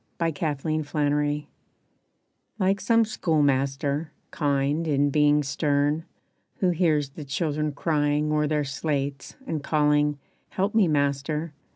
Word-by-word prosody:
=Unanswered 155 Hz, -1 st, -1 dB
Prayers= 145 Hz, 0 st, 0 dB, 1.1 s
Like 195 Hz, -1 st, +1 dB
some 230 Hz, +2 st, +3 dB
school 165 Hz, -8 st, 0 dB
master, 140 Hz, +2 st, 0 dB, 0.2 s
kind 145 Hz, +2 st, 0 dB
in 145 Hz, -1 st, +2 dB
being 150 Hz, 0 st, +3 dB
stern, 145 Hz, +2 st, 0 dB, 0.5 s
Who 185 Hz, -2 st, +1 dB
hears 155 Hz, -5 st, +1 dB
the 150 Hz, -, -8 dB
children 150 Hz, +1 st, -1 dB
crying 150 Hz, 0 st, 0 dB
o'er 150 Hz, 0 st, +2 dB
their 150 Hz, 0 st, 0 dB
slates 140 Hz, 0 st, -3 dB
And 160 Hz, -, -3 dB
calling, 150 Hz, -1 st, +2 dB, 0.3 s
"Help 195 Hz, +2 st, -1 dB
me 220 Hz, -5 st, +4 dB
master!" 150 Hz, +1 st, -1 dB
150 Hz, 115 wpm, -25 LUFS, 145-160 Hz, 1.1 s, me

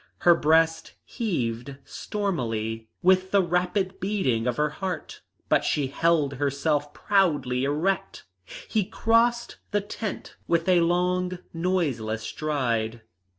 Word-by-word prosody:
Her 175 Hz, -, +7 dB
breast 160 Hz, 0 st, +2 dB
heaved 135 Hz, -, -3 dB
stormily 115 Hz, -, -3 dB
with 185 Hz, +1 st, +4 dB
the 200 Hz, -1 st, +4 dB
rapid 180 Hz, +2 st, 0 dB
beating 155 Hz, -, 0 dB
of 120 Hz, -, -1 dB
her 150 Hz, 0 st, +1 dB
heart, 185 Hz, +2 st, -5 dB, 0.3 s
but -, -, +3 dB
she 145 Hz, -, +1 dB
held 155 Hz, -1 st, +2 dB
herself 145 Hz, +1 st, 0 dB
proudly 145 Hz, -10 st, +1 dB
erect. 155 Hz, +7 st, -1 dB, 0.4 s
He 215 Hz, -2 st, +1 dB
crossed 230 Hz, +4 st, +1 dB
the 205 Hz, -, +1 dB
tent 205 Hz, +1 st, -6 dB
with 170 Hz, 0 st, +1 dB
a 180 Hz, -1 st, +5 dB
long 180 Hz, +1 st, +1 dB, 0.2 s
noiseless 145 Hz, -12 st, -1 dB
stride. 120 Hz, -4 st, -2 dB
165 Hz, 115 wpm, -26 LUFS, 135-190 Hz, 0.4 s, Her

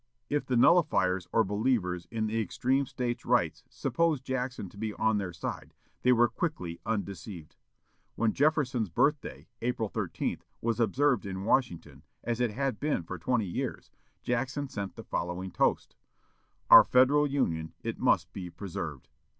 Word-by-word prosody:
If 145 Hz, 0 st, 0 dB
the 125 Hz, -, +1 dB
nullifiers 95 Hz, -, +3 dB
or 115 Hz, -, +4 dB
believers 100 Hz, -4 st, 0 dB
in 110 Hz, -1 st, -2 dB
extreme 125 Hz, +5 st, 0 dB
States' 120 Hz, -1 st, -3 dB
rights -, -, +1 dB
supposed 165 Hz, -5 st, 0 dB
Jackson 125 Hz, -5 st, -3 dB
to 100 Hz, -, -17 dB
be 110 Hz, -1 st, -3 dB
on 110 Hz, -1 st, +2 dB
their 95 Hz, -3 st, -3 dB
side, -, -, -6 dB, 0.3 s
they 125 Hz, -, +4 dB
were 120 Hz, -1 st, +5 dB
quickly 90 Hz, -, -4 dB
undeceived. 100 Hz, -5 st, -4 dB, 0.6 s
When 115 Hz, -1 st, +1 dB
Jefferson's 135 Hz, -, +1 dB
birthday, 145 Hz, -, 0 dB
April 115 Hz, -2 st, -1 dB
13, 95 Hz, -7 st, -3 dB, 0.2 s
was 115 Hz, 0 st, -1 dB
observed 125 Hz, +1 st, +2 dB
in 95 Hz, 0 st, -5 dB
Washington, 110 Hz, -7 st, 0 dB, 0.2 s
as 120 Hz, 0 st, -2 dB
it 120 Hz, -, +2 dB
had 130 Hz, 0 st, -2 dB
been 145 Hz, -, 0 dB
for 90 Hz, +2 st, -7 dB
twenty 120 Hz, +3 st, 0 dB
years, 85 Hz, -, -4 dB, 0.3 s
Jackson 130 Hz, +4 st, -1 dB
sent 100 Hz, -6 st, -5 dB
the -, -, -9 dB
following 90 Hz, +2 st, -3 dB
toast: -, -, 0 dB, 0.8 s
"OUR -, -, +12 dB
FEDERAL 140 Hz, +4 st, +4 dB
UNION: 85 Hz, -, -1 dB
IT -, -, -4 dB
MUST -, -, +2 dB
BE 90 Hz, -2 st, -6 dB
PRESERVED." 80 Hz, -6 st, -6 dB
115 Hz, 150 wpm, -29 LUFS, 95-130 Hz, 0.8 s, OUR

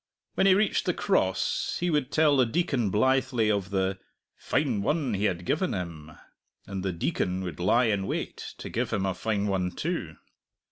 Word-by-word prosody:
When 195 Hz, -, +3 dB
he 190 Hz, -, +7 dB
reached 215 Hz, +2 st, +1 dB
the -, -, +1 dB
Cross -, -, 0 dB
he 175 Hz, 0 st, 0 dB
would 145 Hz, -4 st, 0 dB
tell 155 Hz, -2 st, +4 dB
the 130 Hz, -3 st, +4 dB
Deacon 120 Hz, -, 0 dB
blithely 125 Hz, +1 st, +2 dB
of 100 Hz, -2 st, -1 dB
the 95 Hz, -1 st, -1 dB, 0.4 s
"fine 125 Hz, -9 st, 0 dB
one 145 Hz, +1 st, 0 dB
he 100 Hz, +1 st, 0 dB
had 90 Hz, -3 st, -1 dB
given 180 Hz, -, 0 dB
him," 80 Hz, -4 st, -6 dB, 0.5 s
and 95 Hz, -1 st, -5 dB
the 95 Hz, 0 st, -1 dB
Deacon 90 Hz, +2 st, -1 dB
would 90 Hz, -3 st, -6 dB
lie 110 Hz, +7 st, +3 dB
in 100 Hz, -3 st, 0 dB
wait -, -, -4 dB
to -, -, -7 dB
give -, -, -2 dB
him 95 Hz, -, 0 dB
a 95 Hz, -, 0 dB
fine 105 Hz, +2 st, -1 dB
one 95 Hz, -3 st, 0 dB
too. -, -, -3 dB
105 Hz, 185 wpm, -27 LUFS, 95-135 Hz, 0.5 s, he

